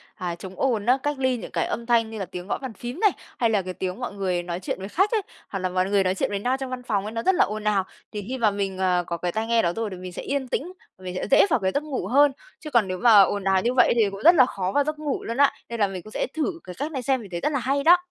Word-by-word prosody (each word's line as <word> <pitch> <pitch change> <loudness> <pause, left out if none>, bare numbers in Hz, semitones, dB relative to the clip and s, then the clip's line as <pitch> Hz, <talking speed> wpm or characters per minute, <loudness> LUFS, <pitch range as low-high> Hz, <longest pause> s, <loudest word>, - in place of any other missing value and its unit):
à, 180 -3 -4
chống 185 +2 -9
ồn 235 -6 +1
á, 250 +3 +4
cách 290 -1 -1
ly 260 -2 +1
những - - -8
cái - - 0
âm 235 - -4
thanh 230 -2 +2
như 220 -1 -7
là 195 - -2
tiếng 180 0 -8
gõ - - -1
bàn 260 -4 -7
phím 245 - -7
này, 420 -4 +5 0.3
hay 230 -2 +2
là 205 -3 +2
cái 185 0 -6
tiếng 185 +4 -4
mọi 245 - -4
người 185 -3 -1
nói 175 0 -4
chuyện 185 - -4
với 190 +1 -6
khách 385 - +2
ấy, 445 - +2 0.3
hoặc 195 - -4
là 185 0 -1
mọi 185 +1 0
người 200 -1 +3
nói 185 0 0
chuyện - - -1
với 200 -1 -2
nhau 250 +5 0
trong 265 -1 -4
văn 255 -1 -5
phòng 205 -5 -1
ấy 215 - -5
nó 230 0 -3
rất 380 - +3
là 400 - +4
ồn 215 0 -5
ào. 210 -2 +2 0.3
Thì 210 - -4
khi 260 +2 -3
mà 220 -3 +3
mình, 195 -1 -3
à, 180 -1 +2
có 170 - -3
cái 175 +1 -2
tai 220 +4 -2
nghe 230 0 +3
đó 170 0 0
rồi 225 -1 -2
thì 185 - -7
mình 180 0 -8
sẽ - - -5
yên 275 -1 -2
tĩnh, 340 +8 -3 0.3
mình 185 -1 -6
sẽ - - -3
dễ 275 - +6
vào 275 - +3
cái 190 -2 0
giấc 285 - -1
ngủ 270 -11 -4
hơn, 285 +5 +5 0.3
chứ 310 - -8
còn 230 -6 +3
nếu 185 - -3
mà 225 -1 +7
ồn 200 +1 +1
ào 190 -1 +3
như 240 +2 0
vậy 250 - +5
thì 220 -4 +3
cũng 195 +1 -8
rất 340 +2 +8
là 260 -5 +7
khó 190 -6 -3
vào 285 - +4
giấc 305 +1 -4
ngủ 295 -3 -2
luôn 230 +3 -4
á. 285 0 +5 0.2
Nên 235 -1 -5
là 205 - +4
mình 190 -2 -6
cũng 215 - -12
sẽ - - -2
thử 330 +2 -2
cái 180 - -9
cách 290 +4 -3
này 270 -4 -3
xem 260 0 +1
mình 205 - -11
thấy 170 - -3
rất 300 - 0
là 280 - 0
hay 275 +3 0
đó. 345 +3 +8
220 Hz, 340 wpm, -24 LUFS, 190-265 Hz, 0.3 s, rất